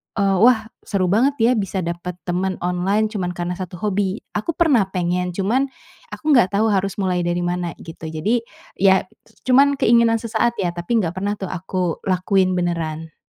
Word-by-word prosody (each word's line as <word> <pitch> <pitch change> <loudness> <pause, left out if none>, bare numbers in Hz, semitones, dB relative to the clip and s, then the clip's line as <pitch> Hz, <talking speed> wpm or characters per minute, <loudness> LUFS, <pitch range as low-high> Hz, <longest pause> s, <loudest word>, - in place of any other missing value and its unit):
eee, 200 -2 +2
"Wah 230 -3 +5 0.2
seru 190 -3 0
banget 260 +8 +3
ya 230 +2 +4
bisa 195 -1 -2
dapet 170 +1 -4
teman 185 +2 -1
online 185 +4 +1
cuman 185 -4 -2
karena 175 0 -3
satu 180 -1 -6
hobi." 200 0 -1 0.2
Aku 210 +11 -1
pernah 275 - +3
pengen 180 0 -1
cuman, 230 +9 +1 0.4
aku - - -9
nggak 190 -7 +4
tahu 215 +2 +3
harus 195 -1 0
mulai 185 -2 0
dari 175 0 0
mana 175 0 -2
gitu. 165 -1 -9
Jadi 215 +10 0 0.4
ya 190 -1 +5
c - - -29 0.2
cuman 280 +2 +5
keinginan 230 0 +4
sesaat 230 +1 0
ya, 180 -3 0
tapi 175 +7 0
enggak 175 -3 -2
pernah 200 +2 -2
tuh 190 - -4
aku 180 -1 -2
lakuin 185 0 +2
beneran. 165 -3 -3
190 Hz, 175 wpm, -21 LUFS, 180-220 Hz, 0.4 s, Wah